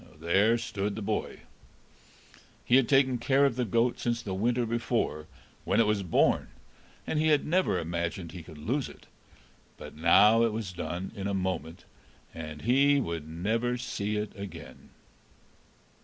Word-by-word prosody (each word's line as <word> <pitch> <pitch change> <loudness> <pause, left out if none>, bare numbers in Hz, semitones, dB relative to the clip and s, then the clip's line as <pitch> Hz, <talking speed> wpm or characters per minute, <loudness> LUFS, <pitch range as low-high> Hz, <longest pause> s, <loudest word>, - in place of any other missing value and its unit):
There 100 +8 +3
stood 105 -3 -3
the 110 - -5
boy. 105 +1 -3 1.2
He 125 - +5
had 135 -3 +2
taken 130 -3 +3
care 135 +4 +3
of 135 -4 +1
the 125 -1 -1
goat 115 +3 +1
since 120 -1 -1
the 95 - -4
winter 120 +5 0
before, 115 -9 -2 0.4
when - - +1
it 115 - +5
was 105 -1 +1
born, 90 -4 +2 0.6
and 155 - -1
he 155 - +2
had 150 -2 +3
never 175 - +1
imagined 85 +1 -3
he 90 - -8
could 80 -1 -13
lose 125 - -2
it; - - -15 0.7
but - - -10
now 100 +8 +5
it 115 -2 +2
was 110 -4 -4
done 85 +2 -5
in 100 -2 -4
a 100 - -1
moment, 90 -3 -3 0.5
and 75 -2 -8
he 140 +4 +4
would 85 - -4
never 115 +9 -1
see 105 -3 -3
it 105 0 -4
again. 100 -1 -10
105 Hz, 160 wpm, -28 LUFS, 90-120 Hz, 1.2 s, He